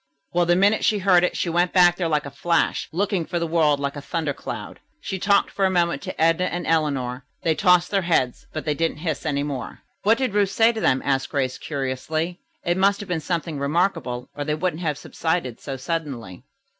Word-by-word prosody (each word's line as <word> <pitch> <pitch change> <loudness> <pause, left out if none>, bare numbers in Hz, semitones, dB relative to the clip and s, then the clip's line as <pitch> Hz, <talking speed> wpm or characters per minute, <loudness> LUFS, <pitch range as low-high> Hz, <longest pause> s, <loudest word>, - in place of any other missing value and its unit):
Well, 175 0 +2
the 175 - +4
minute 200 +4 +3
she 215 - +3
heard 185 -3 +4
it 180 - 0
she - - -1
went 175 +1 +1
back 175 -2 +6
there 175 -1 -1
like 150 -2 0
a 140 - -7
flash, 170 +4 0
looking 190 0 0
for 170 +2 -7
all - - +2
the 170 - -1
world 160 -3 +2
like 140 0 -2
a 145 - -6
thunder 155 -1 -2
cloud. - - -7 0.2
She 190 -9 -4
talked 200 +2 +3
for 195 - -2
a 190 - +4
moment 170 -5 +1
to - - -7
Edna 165 +2 +3
and 175 -1 -3
Eleanor. 140 -6 0 0.2
They 165 - +3
tossed 180 +2 +3
their 200 -1 +2
heads, 145 -8 0
but 155 - -5
they 150 - +1
didn't 165 +1 -1
hiss 160 -1 -3
any 140 -1 0
more." 140 -3 -5 0.2
"What 220 +3 +4
did 260 -6 -1
Ruth 205 -2 +3
say 225 +3 +4
to 220 - -4
them?" 130 - +2
asked 135 -1 0
Grace 130 -3 -1
curiously. 155 +5 -3 0.3
"It 175 +1 +1
must 195 +1 +3
have 205 - -9
been 175 -2 0
something 165 -2 -3
remarkable, 140 -4 -1
or 145 - -3
they 150 +1 -1
wouldn't 160 0 -2
have 150 -5 -1
subsided 160 -7 -2
so 135 -2 -5
suddenly." 130 - -5
165 Hz, 225 wpm, -23 LUFS, 145-180 Hz, 0.3 s, back